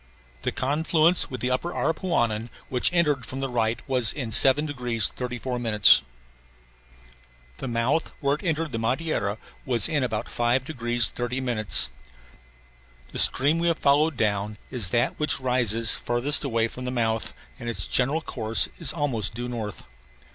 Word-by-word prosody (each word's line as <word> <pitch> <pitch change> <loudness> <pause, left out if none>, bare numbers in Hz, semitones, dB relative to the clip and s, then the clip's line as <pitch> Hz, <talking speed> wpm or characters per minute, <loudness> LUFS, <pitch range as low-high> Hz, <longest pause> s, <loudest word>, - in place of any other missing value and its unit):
The - - -2
confluence 160 +5 +3
with 130 -2 -7
the 125 - -1
upper 150 +7 -2
Aripuanan, 120 - -1 0.2
which 125 +5 +4
entered 150 -7 +1
from 130 +3 -7
the 135 - -2
right, 115 -1 0
was 125 -4 +1
in 125 -6 -5
7 135 +6 +6
degrees 120 - 0
34 125 0 -5
minutes. 105 -4 +4 1.6
The - - -6
mouth 120 +6 -1
where 140 -1 +1
it 150 - -4
entered 160 -2 -1
the 115 - -3
Madeira 115 -4 -1 0.3
was 120 -5 +1
in 150 -4 -1
about 110 -4 -3
5 120 +2 0
degrees 120 -5 +1
30 125 +2 -4
minutes. 115 -5 +1 1.2
The - - -4
stream 145 +5 +5
we 170 - 0
have 165 -2 +1
followed 145 +1 +2
down 105 -1 -1
is 115 -8 -2
that 120 +5 0
which 150 -2 0
rises 120 -4 +1
farthest 120 +6 0
away 115 -4 0
from 125 +2 -9
the - - -2
mouth 115 -3 -2 0.2
and 120 - -5
its 115 - -2
general 140 +6 0
course 115 -6 +1
is - - +1
almost 120 - -2
due 120 +1 -4
north. 110 -4 -6
125 Hz, 160 wpm, -25 LUFS, 115-145 Hz, 1.6 s, 7